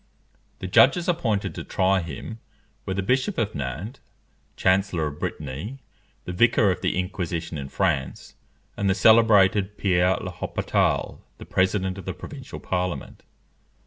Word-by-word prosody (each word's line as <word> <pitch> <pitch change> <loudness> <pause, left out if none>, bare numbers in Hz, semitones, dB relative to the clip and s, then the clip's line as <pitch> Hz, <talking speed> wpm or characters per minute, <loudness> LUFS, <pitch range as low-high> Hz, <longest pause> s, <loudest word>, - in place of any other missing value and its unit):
The - - -7
judges 175 -2 +5
appointed 110 - 0
to - - -6
try 95 0 +1
him 85 +8 -7 0.5
were 95 - -2
the 100 - -1
Bishop 130 - 0
of 110 -2 -1
Nantes 75 - -5 0.5
Chancellor 95 -3 +1
of 75 0 -5
Brittany, 75 - -5 0.5
the - - -4
Vicar 110 0 +4
of 90 - -4
the - - 0
Inquisition 90 -3 -3
in 70 -2 -5
France, 75 -8 -2 0.4
and 100 -1 0
the 95 - +2
celebrated 105 -1 +5
Pierre 90 -1 +2
l'Hôpital, - - -1 0.2
the - - -10
President 95 0 0
of 95 - -10
the - - -4
provincial - - -9
Parliament. 90 -1 -3
95 Hz, 140 wpm, -24 LUFS, 85-105 Hz, 0.5 s, judges